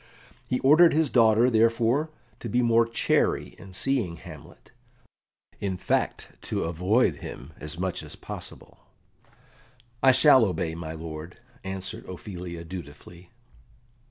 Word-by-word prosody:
He 125 - 0
ordered 155 +5 +6
his 155 -3 +2
daughter, 115 +1 +5
therefore, 115 +6 +2 0.3
to 115 - -6
be 120 +4 +2
more 115 0 +4
chary 115 - +1
in 95 +1 -12
seeing 105 -3 -1
Hamlet - - -13 0.9
in 95 -2 -2
fact, - - -1
to - - -2
avoid 90 +9 +1
him 70 +6 -9
as 75 +1 -4
much 95 0 -2
as - - -10
possible. - - -9 1.2
"I 135 - +7
shall 130 -1 +6
obey, 85 -5 -1
my 80 -1 -6
lord," 80 +3 -8 0.2
answered 95 0 -6
Ophelia 90 -2 -7
dutifully. 85 0 -10
95 Hz, 125 wpm, -26 LUFS, 85-120 Hz, 1.2 s, I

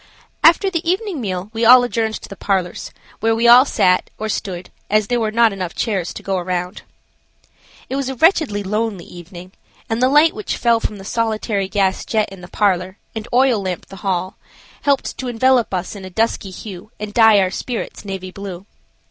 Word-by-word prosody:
After 365 +4 +5
the 335 -3 -1
evening 375 - -1
meal 190 -1 -4
we 225 +1 -2
all 245 +2 +8
adjourned 225 -2 -1
to - - -8
the 200 - -9
parlors, 190 -3 -2 0.3
where 225 +1 +1
all 250 +3 +8
sat, 180 -8 +2
or 220 0 -4
stood, 185 -3 -4 0.2
as 215 0 +3
there 245 +3 0
were 220 -2 0
not 230 +1 +3 0.2
chairs 195 -6 -1
enough - - -7
to - - -8
go 195 -1 -1
round. 180 0 -3 1.1
It 265 - -4
was 275 -1 -2
a 265 - -4
wretchedly 285 - +2
lonely 210 -2 -2
evening, 175 +1 -11 0.4
and 225 +1 -2
the 255 - +4
light 300 +3 +5
which 215 - -4
fell 235 -1 +3
from 215 -2 -4
the 195 - -11
solitary 215 -3 -1
gas 195 -2 0
jet 215 -2 0
in 195 -2 -11
the 180 - -10
parlor, 185 -1 0 0.2
and 220 +1 -5
oil 250 -3 +3
lamp 185 -2 -4
the 195 - -10
hall, 185 -1 -2 0.4
helped 280 -2 0
to 260 - -4
envelop 245 0 +2
us 185 +2 -3
in 200 - -9
a 185 - -7
dusky 220 0 -1
hue 190 +1 -9
and 210 0 -6
dye 225 -2 +6
our 185 -1 +1
spirits 240 +4 -5
navy 190 -2 -6
blue. 195 -1 -8
215 Hz, 195 wpm, -19 LUFS, 190-235 Hz, 1.1 s, all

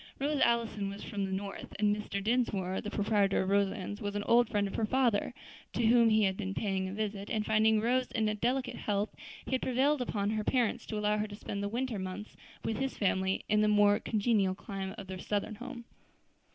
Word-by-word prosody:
Rose 285 +1 0
Allison 230 -4 +1
was 200 +1 -7
from 200 -2 -3
the 190 - -5
North, 195 +1 -5
and 205 0 +3
Mr. 200 -1 -4
Dinsmore, 205 -5 0
the 210 - -5
proprietor 205 -2 +2
of 190 - -2
Roselands, 200 0 0
was 205 0 -3
an 205 - -1
old 240 +1 +4
friend 205 -2 +1
of 195 - -7
her 220 - 0
father, 250 -4 +2 0.4
to 235 - +1
whom 230 0 +6
he 215 0 +4
had 190 -1 +2
been 195 -1 -4
paying 190 -2 -1
a - - -6
visit, 205 -1 -3
and 215 -2 -1
finding 220 0 +4
Rose 250 +3 +1
in 225 -3 +1
delicate 250 +2 -1
health, 205 0 -1 0.3
he - - -7
had 260 - +1
prevailed 265 +3 +2
upon 210 -4 -1
her 215 -1 -1
parents 245 -1 0
to 215 - -3
allow 210 0 +1
her 210 - -1
to 205 - -8
spend 200 -1 -5
the 200 - -2
winter 240 -1 -2
months 190 +3 -6 0.3
with 225 - -1
his 270 0 -2
family 190 -1 0
in 210 0 +3
the 215 - +4
more 205 -1 +5
congenial 205 -4 +1
clime 195 -1 -6
of 205 - -7
their 190 0 -7
Southern 205 +3 -2
home. 240 +2 -8
210 Hz, 220 wpm, -31 LUFS, 200-235 Hz, 0.4 s, whom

